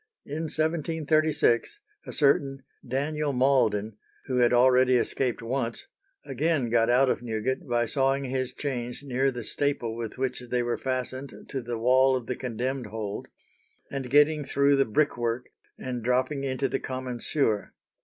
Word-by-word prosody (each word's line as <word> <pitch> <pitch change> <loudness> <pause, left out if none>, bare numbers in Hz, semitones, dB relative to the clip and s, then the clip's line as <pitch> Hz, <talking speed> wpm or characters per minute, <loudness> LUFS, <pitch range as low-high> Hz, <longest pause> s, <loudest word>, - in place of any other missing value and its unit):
In 155 +3 -4
1736, 155 - +1 0.3
a - - -5
certain 140 -2 +2 0.2
Daniel 145 +3 -1
Malden, 110 -5 +2 0.3
who 130 -2 -1
had 120 -1 +4
already 125 +1 +5
escaped 125 0 0
once, 120 -1 -2 0.4
again 140 -2 0
got 115 -1 +3
out 130 +3 +4
of - - 0
Newgate, 120 +7 -2
by 120 -1 +1
sawing 135 +3 +1
his 130 -1 -2
chains 125 -2 -3
near 135 0 +1
the 125 -3 -5
staple 120 -2 -1
with 115 0 -6
which 130 -1 -1
they 125 0 +1
were 120 0 -2
fastened 130 +1 -4
to 135 - -3
the 120 0 -4
wall 130 +3 +4
of 125 -2 -3
the 125 - -3
condemned 125 +1 -3
hold 105 -1 -5 0.6
and 135 -2 -4
getting 150 +2 +4
through 140 +1 +3
the 135 0 +3
brickwork 120 -1 0 0.3
and 125 -2 -4
dropping 130 +3 0
into 135 0 -1
the - - -2
common 130 -2 -5
sewer. 115 -7 0
130 Hz, 155 wpm, -27 LUFS, 120-140 Hz, 0.6 s, already